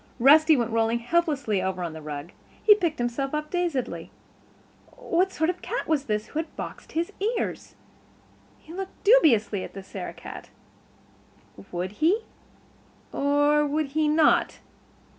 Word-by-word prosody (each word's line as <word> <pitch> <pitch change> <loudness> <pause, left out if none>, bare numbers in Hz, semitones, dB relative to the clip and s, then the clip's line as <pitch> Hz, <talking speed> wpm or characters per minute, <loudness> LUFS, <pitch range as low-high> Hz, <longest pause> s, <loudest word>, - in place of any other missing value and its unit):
Rusty 305 +5 +6
went 235 -2 -1
rolling 225 +1 +1
helplessly 275 - 0
over 185 -1 -2
on 170 -2 -4
the 160 - -9
rug; 150 +2 -7 0.3
he 425 - +8
picked 345 -7 -1
himself 245 +4 -2
up 300 0 -4
dazedly. 345 -8 -2 0.9
What 380 -6 0
sort 320 0 +1
of 365 - -13
a - - -28
cat - - -4
was 295 -3 +1
this 210 0 -1
who 310 - -3
had 325 - -6
boxed - - -8
his 340 +5 -2 0.2
ears? - - -4 0.8
He 320 - -14
looked 385 +1 -7
dubiously 255 - +4
at - - -9
the 195 - -7
Sarah - - -7
cat. - - -10 1.2
Would 180 +1 -3
he 340 - +1 0.9
or 290 +1 +3
would 300 0 -1
he 305 +2 +1
not? 305 +1 +3
295 Hz, 150 wpm, -26 LUFS, 225-330 Hz, 1.2 s, he